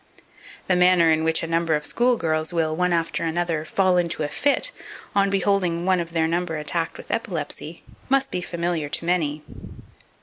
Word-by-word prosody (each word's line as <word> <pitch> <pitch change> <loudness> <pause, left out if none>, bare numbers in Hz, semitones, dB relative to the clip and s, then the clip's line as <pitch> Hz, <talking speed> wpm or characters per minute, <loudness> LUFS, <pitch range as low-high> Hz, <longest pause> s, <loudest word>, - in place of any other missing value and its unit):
The 185 - +2
manner 180 -2 +5
in 160 0 +2
which 160 0 +1
a - - -2
number 165 -1 +1
of 150 0 -3
school 245 +1 +2
girls 160 -2 -1
will, 160 -2 0
one 180 +1 +1
after 165 -1 0
another, 165 -1 -1
fall 185 +1 +2
into 170 -3 0
a - - 0
fit 285 - +1 0.4
on 200 0 +3
beholding 190 -3 +1
one 185 -1 +3
of 170 -1 -5
their 160 -1 +2
number 170 0 -1
attacked 165 +2 -2
with - - -9
epilepsy, 170 -6 -4 0.3
must 270 0 +2
be 180 - -2
familiar 170 -3 -2
to 165 - -2
many. 155 -4 0
170 Hz, 180 wpm, -23 LUFS, 160-180 Hz, 0.4 s, manner